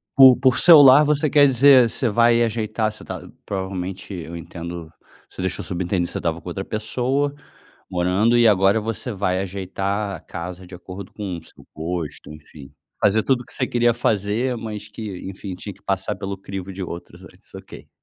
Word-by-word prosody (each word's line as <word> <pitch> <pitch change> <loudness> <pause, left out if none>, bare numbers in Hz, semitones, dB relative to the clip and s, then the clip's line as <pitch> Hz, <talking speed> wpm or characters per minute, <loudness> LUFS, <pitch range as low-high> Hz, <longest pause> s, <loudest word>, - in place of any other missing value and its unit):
Por 130 -2 +9
por 130 -1 +3
"seu 165 -4 +9
lar" 140 +2 +8
você 150 0 +1
quer 145 -1 +6
dizer, 130 -2 +6
você 120 - -1
vai 115 +2 +4
ajeitar 110 -1 -1
você 110 - -11
está - - -7 0.2
provavelmente, 95 0 -5
eu 85 -2 -7
entendo 85 0 -8 0.4
você - - -9
deixou 95 0 -3
subentendido 90 -1 -2
que - - -8
você - - -4
estava 85 -1 -2
com - - -8
outra 95 +3 -5
pessoa 130 +6 -1 0.6
morando 95 +6 +2
e 120 -1 +5
agora 100 0 +4
você 115 +3 -4
vai 95 -2 -1
ajeitar 100 +2 -3
a - - -13
casa 90 +2 -8
de 90 - -12
acordo 95 +2 -9
com 95 -5 -5
o - - -12
seu - - -17
gosto, 80 -1 -5
enfim. 75 -2 -13 0.3
Fazer 105 +2 +3
tudo 130 +1 +1
o - - -9
que - - -7
você - - 0
queria 120 -1 +2
fazer, 115 +2 0
mas 110 -2 -7
que, 105 -3 -7
enfim, 95 0 -7
tinha 100 +3 -8
que 95 - -22
passar 95 -1 -2
pelo 100 0 -5
crivo 95 0 -7
de 95 0 -6
outros 85 -1 -8
antes? - - -18
Ok. - - -11
100 Hz, 195 wpm, -22 LUFS, 90-115 Hz, 0.6 s, Por